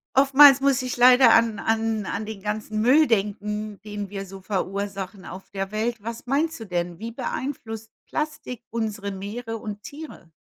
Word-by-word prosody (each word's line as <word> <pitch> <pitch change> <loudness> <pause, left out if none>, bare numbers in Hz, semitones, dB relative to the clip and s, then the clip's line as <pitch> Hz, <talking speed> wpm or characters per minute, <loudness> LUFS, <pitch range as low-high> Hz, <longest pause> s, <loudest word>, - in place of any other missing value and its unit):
oftmals 275 0 +8
muss 275 -2 +2
ich 255 -1 -4
leider 250 -1 +7
an 230 -2 +3
an 225 -2 0
an 215 - -3
den 215 -2 -7
ganzen 215 +1 -3
Müll 280 +7 +5
denken, 210 -1 -2
den 205 -2 -6
wir 195 0 -5
so 195 0 -11
verursachen 195 0 -4
auf 185 +2 -10
der 195 0 -4
Welt. 220 +1 -2
Was 230 +2 -7
meinst 300 +5 0
du 225 - -7
denn? 175 -2 -3
Wie 230 +1 -5
beeinflusst 235 -3 -5 0.2
Plastik 300 -6 -4
unsere 215 -3 -3
Meere 225 +4 -5
und 210 -1 -7
Tiere? 285 - -10
220 Hz, 165 wpm, -24 LUFS, 200-245 Hz, 0.2 s, oftmals